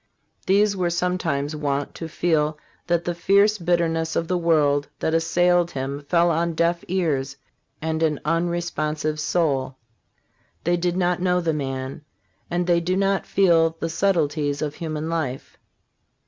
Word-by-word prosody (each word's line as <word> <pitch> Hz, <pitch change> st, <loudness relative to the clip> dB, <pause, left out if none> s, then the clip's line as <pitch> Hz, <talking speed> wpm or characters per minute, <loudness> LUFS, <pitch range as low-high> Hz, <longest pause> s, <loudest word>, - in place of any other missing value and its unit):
These 200 Hz, +2 st, +3 dB
were 180 Hz, -2 st, 0 dB
sometimes 170 Hz, -5 st, -1 dB
wont 145 Hz, -2 st, -2 dB
to 165 Hz, -, -6 dB
feel 155 Hz, -2 st, 0 dB, 0.3 s
that 170 Hz, -1 st, +1 dB
the 175 Hz, -, -1 dB
fierce 200 Hz, +4 st, +3 dB
bitterness 165 Hz, -2 st, 0 dB
of 165 Hz, -, 0 dB
the 180 Hz, -, 0 dB
world 145 Hz, -4 st, +2 dB
that 160 Hz, -, -1 dB
assailed 175 Hz, +1 st, +2 dB
him 140 Hz, -1 st, -4 dB
fell 170 Hz, -1 st, +4 dB
on 170 Hz, +1 st, 0 dB
deaf 170 Hz, +1 st, +1 dB
ears 145 Hz, -7 st, -1 dB, 0.5 s
and 160 Hz, 0 st, -1 dB
an 155 Hz, -3 st, +1 dB
unresponsive 155 Hz, -2 st, -1 dB
soul. 145 Hz, -5 st, 0 dB, 0.9 s
They 175 Hz, +1 st, +2 dB
did 175 Hz, 0 st, -1 dB
not 180 Hz, -1 st, +1 dB
know 180 Hz, -1 st, +2 dB
the 165 Hz, -2 st, 0 dB
man, 135 Hz, -1 st, -4 dB, 0.5 s
and 175 Hz, +1 st, 0 dB
they 170 Hz, -1 st, +3 dB
do 180 Hz, +2 st, -1 dB
not 195 Hz, 0 st, +1 dB
feel 165 Hz, -4 st, +3 dB
the 165 Hz, -, -2 dB
subtleties 155 Hz, -5 st, 0 dB
of 145 Hz, -1 st, -3 dB
human 155 Hz, -1 st, -4 dB
life. 155 Hz, -6 st, -4 dB
165 Hz, 145 wpm, -23 LUFS, 150-175 Hz, 0.9 s, fell